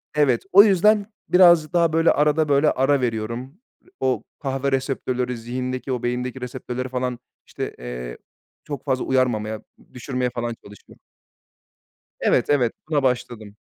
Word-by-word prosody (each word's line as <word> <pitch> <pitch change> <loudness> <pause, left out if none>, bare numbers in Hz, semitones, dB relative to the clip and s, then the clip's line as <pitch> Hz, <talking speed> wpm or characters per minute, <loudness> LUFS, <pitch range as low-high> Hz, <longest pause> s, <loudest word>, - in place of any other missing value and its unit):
Evet, 135 -6 +2
o 200 +2 +9
yüzden 205 +1 +4 0.2
birazcık 175 -3 +5
daha, 170 -2 +2
böyle, 165 +1 +4
arada, 150 +1 +2
böyle, 145 +2 +4
ara 135 +1 +2
veriyorum. 120 - -4 0.4
O 130 -1 0 0.2
kahve 135 0 -2
reseptörleri 130 -2 -2
zihindeki 130 +3 -4
o 125 -1 -3
beyindeki 125 +1 -3
reseptörleri 125 0 -5
falan, 125 -1 -3 0.3
işte, - - -6
eee, - - -7 0.5
çok 145 -2 -7
fazla 130 -2 -1
uyarmamaya, 110 -5 0 0.3
düşürmeye 125 0 -2
falan 120 -1 -4
çalışıyor. 100 -1 -16 1.2
Evet, - - +2
evet, 125 -6 +2 0.2
buna 145 -3 +1
başladım. 115 -4 -2
130 Hz, 130 wpm, -22 LUFS, 120-145 Hz, 1.2 s, o